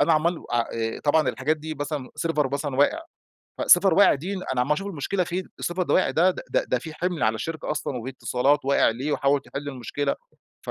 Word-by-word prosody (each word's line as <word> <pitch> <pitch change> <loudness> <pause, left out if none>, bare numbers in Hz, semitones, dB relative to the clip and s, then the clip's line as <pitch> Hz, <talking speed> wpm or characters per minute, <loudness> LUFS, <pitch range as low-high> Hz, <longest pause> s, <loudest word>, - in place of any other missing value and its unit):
أنا 165 - +4
عَمال 165 +2 +1
أ 120 - +1 0.2
آآ 115 0 -3
طبعًا 155 +1 +3
الحاجات 135 +7 0
دي 155 +1 -6
مثلًا 145 -2 -4 0.2
Server 150 -4 0
مثلًا 140 -2 -2
واقع، 145 - +3 0.6
فServer 195 -2 +6
واقع 200 +5 +6
دي 165 +8 -5
أنا 130 -9 -2
عمال 130 +4 +2
أشوف 195 +6 -2
المشكلة 185 +1 -1
فين؟ 180 +2 -3 0.2
ال - - -4
Server 175 +2 -3
اللي 180 - +1
وقع 185 - +3
ده 180 +3 +4
د - - -6
ده - - +1
ده 125 - 0
فيه 160 +5 -8
حِمل 175 0 -2
على 110 +1 +3
الشركة 160 +8 -4
أصلًا 150 -3 -2
واتصالات 130 +3 0
واقع 140 -3 +3
ليه؟ 135 +6 -3
وحاول 140 0 +2
تحل 145 +1 -6
المشكلة 140 +2 -2 0.5
ف. - - -3
145 Hz, 220 wpm, -25 LUFS, 135-165 Hz, 0.6 s, فServer